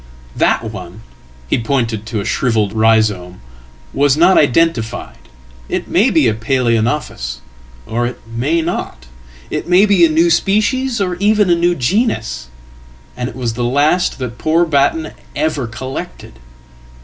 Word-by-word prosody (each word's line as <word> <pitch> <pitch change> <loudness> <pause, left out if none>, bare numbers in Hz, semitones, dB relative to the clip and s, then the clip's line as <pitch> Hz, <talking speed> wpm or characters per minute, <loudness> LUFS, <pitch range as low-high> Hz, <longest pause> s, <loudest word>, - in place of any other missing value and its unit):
"That - - +1
one 90 +6 -9 0.2
" 60 +1 -26
he - - 0
pointed 115 -4 -1
to 115 -2 -3
a 100 - -4
shrivelled 110 -5 0
rhizome 110 -5 +1 0.5
"was 140 0 +2
not 175 +4 +5
identified. 145 -5 +1 0.5
Itmay 215 +8 +1
be 155 -7 +3
a 110 - +2
Palaeonophis 115 - -1 0.4
or 120 - -1
it 120 0 -7
may 130 +9 -1
not. 160 - -4 0.5
It - - -3
may 180 +3 +5
be 200 -4 +3
a 165 - +6
new 165 +2 +3
species, 215 +8 +1
or 180 -3 -1
even 205 -1 +2
anew 175 +1 +2
genus. 125 - -1 0.7
And 125 0 -3
it 115 - -11
was 120 -3 -3
the 120 +2 -3
last 145 +8 +1
that 120 -3 -6
poor 165 +2 +2
Batten 155 +1 +1 0.2
ever 150 -4 -1
collected."" 120 - -7
130 Hz, 140 wpm, -16 LUFS, 115-170 Hz, 0.7 s, a